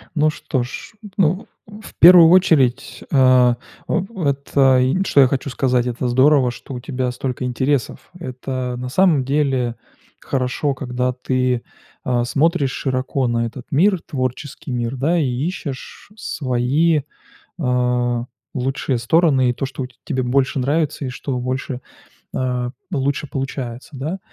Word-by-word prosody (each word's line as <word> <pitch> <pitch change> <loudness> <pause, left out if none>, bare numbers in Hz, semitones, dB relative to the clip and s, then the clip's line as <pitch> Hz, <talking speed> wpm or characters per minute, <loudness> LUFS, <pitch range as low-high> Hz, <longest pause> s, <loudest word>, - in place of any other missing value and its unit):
Ну 155 0 +3
что 135 -4 -2
ж, 125 - -8 0.2
ну, 185 +1 +1 0.2
в 210 +1 -12
первую 170 -1 +9
очередь, 145 -8 +3
а, 130 -2 +5 0.3
в 190 - 0
вот, 140 -8 -2
э, 135 -2 +5
и 140 +10 +1
что 140 - +5
я 130 - +6
хочу 135 +2 -2
сказать: 125 -2 +1
это 125 +1 -2
здорово, 130 +1 +4
что 125 - -10
у 125 - -5
тебя 125 0 -3
столько 125 0 -4
интересов. 130 +1 -1
Это 130 -4 -4
на 125 +1 -5
самом 165 -2 +3
деле 135 -3 0 0.4
хорошо, 135 +2 -1
когда 125 -1 -2
ты, 125 -1 -1 0.4
а, 120 -1 0
смотришь 145 +1 +1
широко 130 0 -1
на 115 0 0
этот 120 +2 -8
мир, 185 +5 +3
творческий 130 +1 -4
мир, 120 0 -2
да, 155 +7 +1
и 155 - +1
ищешь 135 +5 -5
свои, 145 - +1 0.6
а, 125 -3 0 0.3
лучшие 130 0 -1
стороны 135 0 +3
и - - +1
то, 135 - -4
что 135 0 -5
у - - -3
т 125 - -20
тебе 130 -5 -1
больше 130 +2 +1
нравится 145 +2 0
и - - -3
что 125 +1 -4
больше, 130 +1 -3 0.5
а, 125 -1 -1 0.2
лучше 140 -1 -1
получается, 130 -3 -5
да. 150 +8 -4
130 Hz, 150 wpm, -20 LUFS, 125-145 Hz, 0.6 s, первую